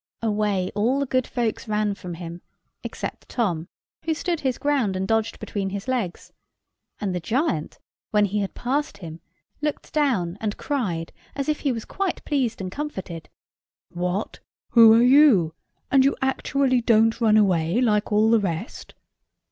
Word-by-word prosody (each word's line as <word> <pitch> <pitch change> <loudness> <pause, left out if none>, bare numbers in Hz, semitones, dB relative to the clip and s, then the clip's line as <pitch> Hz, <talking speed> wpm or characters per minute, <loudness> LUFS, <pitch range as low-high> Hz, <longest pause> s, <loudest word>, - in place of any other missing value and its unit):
Away 205 -4 0
all 235 +7 +1
the 280 - 0
good 255 -1 0
folks 235 -2 -2
ran 210 -1 0
from 180 -3 -7
him, 170 0 -8 0.4
except - - -6
Tom, 175 -9 -1 0.4
who 320 0 0
stood 340 0 -2
his 260 -4 -1
ground 275 -10 +1
and 190 +1 -2
dodged 225 0 0
between 195 -2 -3
his 200 +3 -6
legs; 235 -9 -3 0.7
and 195 -3 -2
the 180 - -1
giant, 175 - -1 0.3
when 210 -1 +3
he 205 +1 -1
had 200 -1 -3
passed 270 -2 -2
him, 165 -3 -9 0.4
looked 300 -1 -3
down, 210 - 0
and 215 -1 -2
cried, 195 - -2 0.2
as 275 -1 -3
if 305 -1 0
he 280 - 0
was 230 -3 -4
quite 390 -2 -3
pleased 265 -6 0
and 185 -1 -4
comforted,— 190 - -6 0.6
"What? 180 +4 -3 0.3
who 230 -2 +8
are - - +5
you? 250 - +5 0.4
And 270 -1 +6
you 275 - +3
actually 265 -1 +1
don't 225 0 +3
run 215 -2 +5
away, 180 -2 +2
like 215 -5 +1
all 215 +2 +4
the 230 - +5
rest?" 190 +1 -5
220 Hz, 165 wpm, -24 LUFS, 190-265 Hz, 0.7 s, who